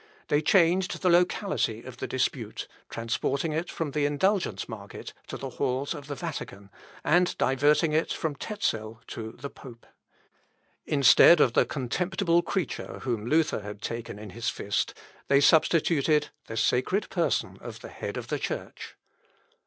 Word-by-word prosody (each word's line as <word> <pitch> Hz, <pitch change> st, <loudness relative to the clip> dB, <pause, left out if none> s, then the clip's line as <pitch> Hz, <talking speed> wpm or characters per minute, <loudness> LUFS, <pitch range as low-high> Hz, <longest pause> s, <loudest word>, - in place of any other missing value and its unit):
They 145 Hz, 0 st, +3 dB
changed 180 Hz, +2 st, +3 dB
the 180 Hz, -, +4 dB
locality 175 Hz, +1 st, +1 dB
of -, -, -10 dB
the -, -, -4 dB
dispute, -, -, -2 dB, 0.2 s
transporting 130 Hz, +7 st, -1 dB
it 165 Hz, +3 st, -2 dB
from 160 Hz, -3 st, -3 dB
the 145 Hz, 0 st, +1 dB
indulgence 190 Hz, +7 st, 0 dB
market 105 Hz, -4 st, -8 dB
to -, -, -5 dB
the 135 Hz, -1 st, -6 dB
halls 135 Hz, +3 st, -1 dB
of 145 Hz, -3 st, -9 dB
the 145 Hz, -, -4 dB
Vatican, 100 Hz, -, -6 dB, 0.3 s
and 175 Hz, +2 st, +3 dB
diverting 150 Hz, +4 st, +3 dB
it 160 Hz, +1 st, +1 dB
from 155 Hz, -3 st, -2 dB
Tezel 115 Hz, -, -3 dB
to 110 Hz, -1 st, -6 dB
the 140 Hz, +3 st, -8 dB
pope. 120 Hz, -3 st, -13 dB, 1.0 s
Instead 150 Hz, +3 st, +7 dB
of 125 Hz, -5 st, +4 dB
the -, -, +3 dB
contemptible 170 Hz, -, 0 dB
creature 175 Hz, -2 st, -3 dB
whom 115 Hz, -4 st, -2 dB
Luther 155 Hz, -1 st, +2 dB
had 105 Hz, 0 st, -8 dB
taken 115 Hz, -2 st, -5 dB
in 105 Hz, -2 st, -9 dB
his 115 Hz, +2 st, -2 dB
fist, 100 Hz, -, -2 dB, 0.3 s
they 140 Hz, -, +5 dB
substituted 155 Hz, 0 st, +3 dB, 0.2 s
the 115 Hz, -, -6 dB
sacred 130 Hz, -, +1 dB
person -, -, 0 dB
of -, -, -8 dB
the -, -, -9 dB
Head -, -, -6 dB
of -, -, -6 dB
the -, -, -1 dB
church. -, -, -5 dB
145 Hz, 155 wpm, -27 LUFS, 120-170 Hz, 1.0 s, Instead